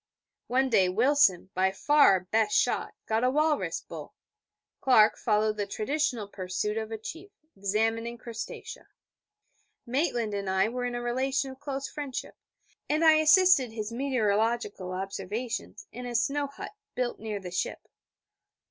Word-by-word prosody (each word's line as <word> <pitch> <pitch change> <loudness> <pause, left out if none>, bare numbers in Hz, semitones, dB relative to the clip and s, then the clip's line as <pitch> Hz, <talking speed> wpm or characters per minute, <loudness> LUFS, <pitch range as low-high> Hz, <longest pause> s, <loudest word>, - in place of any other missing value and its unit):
One 265 +2 +2
day 190 -5 +4
Wilson, 210 -4 +3
by 190 +1 +2
far 290 +3 +5
our 190 - +2
best 210 +3 +1
shot, 245 - 0
got 220 +2 0
a 250 - +4
walrus 300 +2 +1
bull; - - -10 0.6
Clark 220 -5 +5
followed 215 -1 +1
the 205 -1 -2
traditional 235 0 -1
pursuit 200 +2 -3
of 220 0 -4
a 225 - -3
Chief, 330 - -8 0.3
examining 225 +4 -1
Crustacea; 230 -1 -8 1.0
Maitland 240 -4 -1
and 200 -1 -3
I 190 +3 +2
were 250 +1 -3
in 245 0 -3
a 240 - -3
relation 265 +2 -1
of 265 - -13
close 275 -1 -4
friendship, 285 -4 -6 0.5
and 310 +2 +2
I 315 -1 +7
assisted 310 - +5
his 215 -1 -4
meteorological 225 -6 0
observations 195 +5 -5
in 245 +1 -7
a 240 - -5
snow 285 +4 +1
hut 280 - -9 0.2
built 250 -1 -2
near 215 -2 -4
the 180 -2 -8
ship. 180 - -3
230 Hz, 150 wpm, -28 LUFS, 210-270 Hz, 1.0 s, I